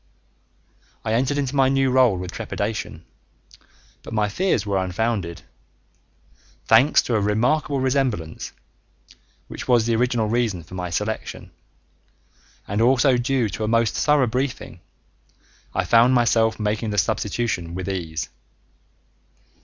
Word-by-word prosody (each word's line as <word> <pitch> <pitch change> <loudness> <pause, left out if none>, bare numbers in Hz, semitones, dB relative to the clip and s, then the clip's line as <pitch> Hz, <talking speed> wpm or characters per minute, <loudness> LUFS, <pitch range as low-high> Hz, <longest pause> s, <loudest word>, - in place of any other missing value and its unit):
I 110 - 0
entered 130 +5 +1
into 140 -1 -2
my 135 -1 +4
new 135 -1 +2
role 125 -6 +4
with 90 0 -6
trepidation, 100 -6 -4 1.0
but 115 - -8
my 105 -1 +1
fears 120 - 0
were 100 -2 0
unfounded. 95 -2 -2 1.2
Thanks 125 +7 +5
to 120 - -2
a 105 - +2
remarkable 125 +8 +1
resemblance 130 - -1 1.0
(which - - -8
was 120 -3 +4
the 115 -1 +1
original 120 -1 +1
reason 110 -6 -1
for 80 - -15
my 90 -1 -4
selection) 105 +6 -4 1.2
and 100 +3 -1
also 130 +2 +4
due 125 -1 0
to 110 - -5
a - - -1
most 115 0 +2
thorough 150 -3 +3
briefing, 125 +3 -3 0.9
I - - -1
found 115 +6 +5
myself 115 -2 +2
making 105 +1 -1
the 105 - -3
substitution 90 -5 -1
with 95 0 -5
ease. 85 -5 -3
115 Hz, 130 wpm, -22 LUFS, 100-130 Hz, 1.2 s, Thanks